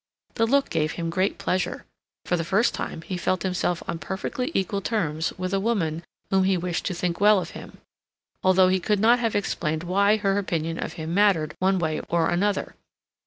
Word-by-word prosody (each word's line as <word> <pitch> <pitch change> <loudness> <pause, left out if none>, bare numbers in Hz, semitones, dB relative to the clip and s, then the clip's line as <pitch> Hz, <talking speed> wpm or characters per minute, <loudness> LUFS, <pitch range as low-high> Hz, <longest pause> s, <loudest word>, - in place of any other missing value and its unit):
The 225 -1 +1
look 275 +3 +2
gave 155 0 0
him 165 -1 -3
great 185 +3 0
pleasure. 185 0 -2 0.4
For 180 - +1
the 165 - -1
first 195 +7 +2
time 160 - -5
he 185 - -4
felt 175 0 -1
himself 180 -2 -1
on 165 - -3
perfectly 225 - -3
equal 195 +1 0
terms 165 -7 -1
with 185 +1 -3
a 195 - +2
woman 175 -7 -1 0.3
whom 190 -1 +3
he 190 -1 +2
wished 175 -1 -3
to 185 - -2
think 175 +1 -2
well 210 -1 +6
of - - -6
him, - - -10 0.7
although 185 0 +5
he 190 0 +2
could 210 +3 0
not 235 +4 +5
have 230 -2 -1
explained 160 -5 -1
why 200 +4 +3
her 200 -1 +1
opinion 165 -4 -2
of - - -6
him 160 +1 -5
mattered 180 -6 +3
one 190 +1 +2
way 160 -3 -1
or 165 -1 +2
another. 200 +3 0
185 Hz, 200 wpm, -25 LUFS, 170-200 Hz, 0.7 s, well